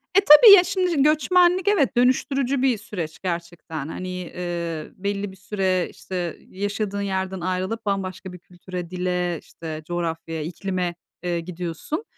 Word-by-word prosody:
E, 395 - +7
tabii, 395 +5 +10
ya, 360 - +6
şimdi 360 -6 +1
göçmenlik, 355 +5 +3
evet, 285 -11 +2
dönüştürücü 260 +1 +2
bir 260 -4 +3
süreç 175 -7 -6
gerçekten. 170 -4 -5
Hani, 185 +3 -6
eee, 175 -3 -5
belli 200 0 -3
bir 190 - -15
süre, 190 -2 0
işte, 180 -3 -5
yaşadığın 200 +1 -3
yerden 190 -1 -2
ayrılıp 185 +5 -2
bambaşka 190 -2 -3
bir 180 - -10
kültüre, 180 0 -8
dile, 180 -2 -1
işte, 155 -1 -8
coğrafyaya, 165 -2 -3
iklime, 180 +1 -3 0.3
eee, 175 -1 -1
gidiyorsun. 175 - -5
185 Hz, 140 wpm, -23 LUFS, 175-235 Hz, 0.3 s, tabii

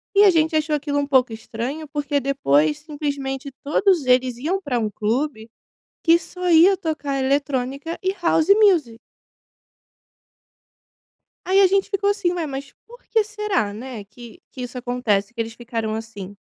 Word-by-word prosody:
E 405 +1 +7
a 395 - +8
gente 320 -2 +2
achou 305 0 +1
aquilo 285 0 -1
um 285 - 0
pouco 255 -4 +3
estranho, 240 +7 -5
porque 290 0 -1
depois 155 - +2
simplesmente 285 -2 -4
todos 320 0 +2
eles 250 -1 +3
iam 350 +9 -1
pra 265 -8 -2
um 215 -2 -1
clube 225 +2 -2 0.6
que 335 0 +6
só 360 +1 -5
ia 345 +4 +6
tocar 295 -6 -3
eletrônica 275 +3 -1
e 380 0 +1
House 330 -1 +2
Music. 320 - +3 2.5
Aí, 385 +2 +4
a 390 - +7
gente 390 +1 +1
ficou 405 0 +1
assim: 395 -4 0
"Ué, 340 -3 -2
mas 275 0 -6
por 485 +2 -15
que 445 -2 +2
será, 420 - -1
né, 230 -1 -8
que 225 +2 -14
que 255 - -8
isso 245 +1 -7
acontece, 235 -4 -1
que 235 - -6
eles 225 0 -3
ficaram 230 -2 -4
assim?" 205 -3 -7
280 Hz, 160 wpm, -22 LUFS, 240-335 Hz, 2.5 s, a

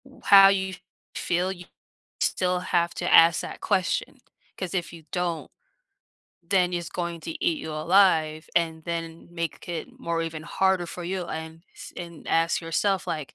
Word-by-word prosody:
W - - -17
how 195 -1 +9
you 190 -1 0 0.4
feel 180 +2 0
you 180 -2 -9 0.6
still 180 -1 +1
have 175 -1 0
to - - -2
ask 165 0 +7
that - - -8
question, 185 -2 0 0.4
'cause 185 -3 -4
if 175 -2 -2
you 165 -1 -11
don't, 175 -3 -2 0.9
then 180 0 +2
it's 175 -1 -3
going 170 -1 -4
to 165 - -6
eat 165 - +2
you 160 - -6
alive, 155 -1 +3
and 160 -1 +1
then, 165 -1 -5
make 170 -1 -4
i - - -3
it 165 - -7
more 170 0 -1
even 160 -1 -5
harder 185 +2 +1
for 175 +1 -7
you 185 +1 -3
and 160 0 -7
s - - -10
and 170 -2 -9
ask 165 +1 +2
yourself, 185 +4 0
like, 155 -4 -4
170 Hz, 170 wpm, -26 LUFS, 165-180 Hz, 0.9 s, how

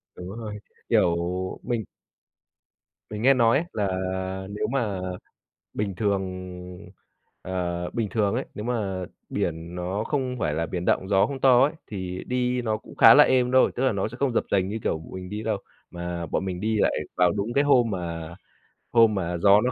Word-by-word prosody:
Đúng 90 +4 -8
rồi, 105 -2 -6 0.3
kiểu, 85 - +4 0.5
mình 120 -3 -1 1.3
mình 105 0 -5
nghe 135 +4 +6
nói 120 -1 +4
ấy 165 - -1
là 105 -2 0 0.6
nếu 105 - -2
mà 110 -8 -1 0.7
bình 100 -2 -2
thường, 100 -1 0 1.2
ờ, 90 -1 -3
bình 115 -3 -2
thường 105 -4 +1
ấy, - - -1
nếu 105 - -6
mà 100 -6 -2 0.2
biển 85 +1 -3
nó 90 +4 -2
không 130 -3 -1
phải 75 - 0
là 80 +1 -1
biển 90 +2 -4
động, 95 - +1
gió 100 0 +4
không 135 +2 -6
to 130 -2 +6
ấy, 145 - +1 0.2
thì 95 -3 -5
đi 125 0 0
nó 110 -2 0
cũng - - -14
khá - - +9
là - - +9
êm 125 -1 +2
thôi, 130 - +5
tức 125 - -1
là 130 - +3
nó 100 0 -1
sẽ 120 - -10
không 135 0 0
dập - - +1
dềnh 95 -2 +2
như, 110 +3 -3
kiểu, - - 0
b 80 - -12
mình 90 0 -7
đi 105 +1 -4
đâu. 110 -1 0 0.3
Mà 85 -1 -4
bọn 90 - -1
mình 90 -2 -4
đi 110 +1 0
lại - - +3 0.2
vào 90 -1 +4
đúng 105 +4 -2
cái 140 +3 +3
hôm 125 -5 +4
mà 85 -3 -4 0.6
hôm 115 -2 +5
mà 90 -2 -2
gió 100 +4 +6
nó 125 +2 +1
105 Hz, 200 wpm, -25 LUFS, 90-120 Hz, 1.3 s, khá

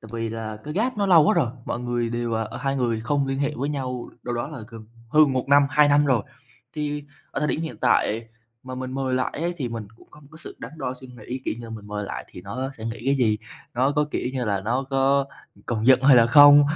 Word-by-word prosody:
tại 110 - -12
vì 115 -1 -2
là 110 -1 -5
cái 150 +1 -6
gap 240 +5 0
nó 200 -1 +1
lâu 170 -5 +7
quá - - +4
rồi, 155 -9 +2 0.2
mọi 120 - -3
người 120 -1 -1
đều, 120 0 -2
ờ 110 0 0
ờ, - - -7
hai 135 -1 -1
người 120 -4 0
không 140 +5 0
liên 135 0 -2
hệ 145 +1 0
với 140 +3 -2
nhau 130 -4 -4
đâu 120 - -3
đó 120 +3 -3
là 150 -5 -8
gần 115 -2 -11 0.2
hơn 150 +2 +5
1 130 -1 0
năm, 140 0 +6
2 150 +1 +5
năm 145 +1 +4
rồi. 125 -6 +2 0.5
Thì 150 -1 -3 0.3
ở - - -3
thời 150 - +1
điểm 155 - -1
hiện 160 - -5
tại 115 -2 +1 0.3
mà 130 0 -7
mình 130 0 -5
mời 130 -1 -1
lại 130 - 0
ấy 175 +1 -1
thì 130 -4 -2
mình 115 -3 -6
cũng - - -20
có 150 - -16
một 145 - -18
cái 160 - -12
sự - - -10
đắn - - -8
đo 130 -3 -3
suy 130 +1 -12
nghĩ, 125 +1 -7
kiểu - - -1
như 120 - -8
là 115 - -9
mình 110 -2 -8
mời 105 0 -4
lại - - -6
thì - - -10
nó 130 +8 -4
sẽ 110 - -7
nghĩ 115 0 -5
cái 135 - +4
gì? 110 -5 +2 0.4
Nó 130 +4 +2
có, 150 - +3
kiểu - - -2
như 130 -2 -2
là, 100 -3 0
nó 120 +7 -1
có 135 +1 +3 0.4
còn 110 -2 -1
giận 130 -1 +7
hay 135 -1 +7
là 115 -1 +6
không? 145 +3 +9
130 Hz, 275 wpm, -24 LUFS, 115-145 Hz, 0.5 s, không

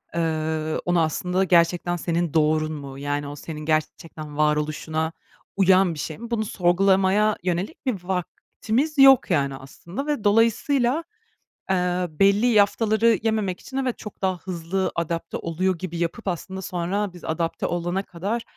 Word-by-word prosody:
eee, 160 -1 -1
onu 175 -1 +2
aslında 180 +4 0
gerçekten 175 0 +2
senin 170 -1 -1
doğrun 155 0 +2
mu, 140 -2 -8
yani, 145 0 -2
o 145 - -7
senin 150 +1 -7
gerçekten 155 -1 -3
varoluşuna 155 +1 0 0.5
uyan 190 -2 +4
bir 150 - -8
şey 155 +1 -5
mi, 235 +1 -9
bunu 220 -2 0
sorgulamaya 195 +3 +3
yönelik 185 - -3
bir 205 -9 -2
vaktimiz 220 - -2
yok, 270 -6 +7
yani, 140 -5 +1
aslında 170 - -8
ve 290 -8 -1
dolayısıyla, 240 +7 +2 0.7
eee, 180 -1 +1
belli 200 +8 +3
yaftaları 220 +1 +3
yememek 215 -5 0
için 265 - -8
evet, 260 -3 -1
çok 210 - -10
daha 185 -1 0
hızlı 185 +1 -3
adapte 170 0 -3
oluyor 180 +2 -1
gibi 170 -1 -5
yapıp 170 +7 -3
aslında 190 +1 -4
sonra 185 +3 -2
biz 175 - -13
adapte 165 +1 -2
olana 175 +2 -1
kadar 200 +6 -4
180 Hz, 145 wpm, -24 LUFS, 160-205 Hz, 0.7 s, yok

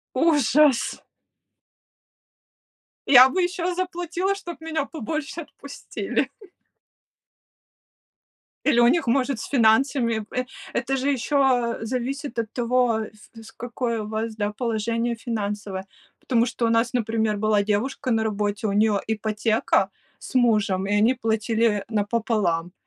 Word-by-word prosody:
Ужас! 295 -2 +3 2.1
Я 260 -1 +9
бы 370 +6 0
еще 355 0 -1
заплатила, 355 +1 -2
чтоб 350 -5 -8
меня 320 -2 -2
побольше 310 +2 -5
отпустили. 280 -2 -4 2.4
Или 240 - +4
у 240 - +6
них, 325 +4 +2
может, 255 +1 +1
с - - -5
финансами 235 -1 +3
в 215 0 -9
э 250 - 0 0.3
это 270 - -1
же 270 +2 0
еще, 275 +1 -1 0.4
э, - - -5
зависит 255 +2 -4
от 225 -1 -2
того, 245 -2 +1 0.3
вс 225 -1 -12
в - - -29
какое 235 -1 -3
у 210 - -7
вас, 220 +1 -3
да, 205 -1 -2
положение 230 +1 -1
финансовое. 205 -4 -4 0.4
Потому 235 -2 +2
что 245 -1 -1
у - - +2
нас, 230 +1 +2
например, 225 -3 0
была 215 -1 +2
девушка 235 +6 -1
на 225 -2 +2
работе, 210 +1 -2
у 200 - -1
нее 210 0 +2
ипотека 220 0 0 0.3
с - - -11
мужем, 210 -6 +2
и 205 - -2
они 235 +5 +4
платили, 225 -1 0
э, 205 -2 -2
напополам. 205 -6 0
230 Hz, 135 wpm, -24 LUFS, 215-270 Hz, 2.4 s, Я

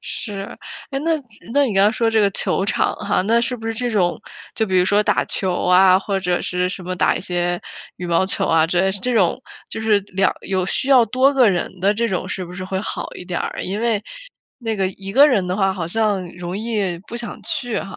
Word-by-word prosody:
是， 205 -3 -5 0.5
诶， 270 - -2
那 330 +3 -1 0.4
那 285 0 +4
你 215 - -2
刚 200 +3 +4
说 230 -2 +1
这 225 - +3
个 200 -1 +3
球 190 - 0
场 200 - +1
哈， - - 0
那 230 +4 +3
是 245 +1 -1
不 225 0 -8
是 225 - -1
这 245 +1 -2
种， 185 -5 +1 0.3
就 220 - 0
比 190 - 0
如 180 - +4
说 205 +2 +3
打 - - +1
球 185 -2 -1
啊， 185 +1 +6
或 195 -1 -2
者 180 -1 0
是 180 0 -1
什 185 - -6
么 185 +1 -4
打 180 - +2
一 - - -4
些 175 -1 -1 0.4
羽 180 - -6
毛 170 +2 +2
球 190 - -2
啊， 165 0 +3
这 185 +3 +1
种 220 -1 +1 0.3
就 220 - -6
是 215 -2 +3
两 190 +1 +1
有 190 -1 -1
需 260 - -2
要 255 -4 +7
多 260 +5 +3
个 255 -5 +5
人 180 0 -3
的 200 +2 +3
这 230 +2 0
种 185 -1 -2
是 190 -1 -4
不 175 - -10
是 185 +1 -6
会 190 0 -3
好 - - -4
一 180 - -8
点 175 -1 -3
儿， - - -4
因 200 +4 -3
为 225 -3 +1 0.6
那 225 -3 -3
个 195 -1 +1
一 195 +1 -8
个 280 +5 +7
人 210 -10 +2
的 180 +2 -2
话 195 -2 +2
好 175 -4 -4
像 205 -2 0
容 175 +1 -5
易 205 -6 -2
不 235 - -5
想 235 0 -6
去 245 -3 -2
哈。 195 - -8
195 Hz, 255 characters per minute, -20 LUFS, 185-225 Hz, 0.6 s, 要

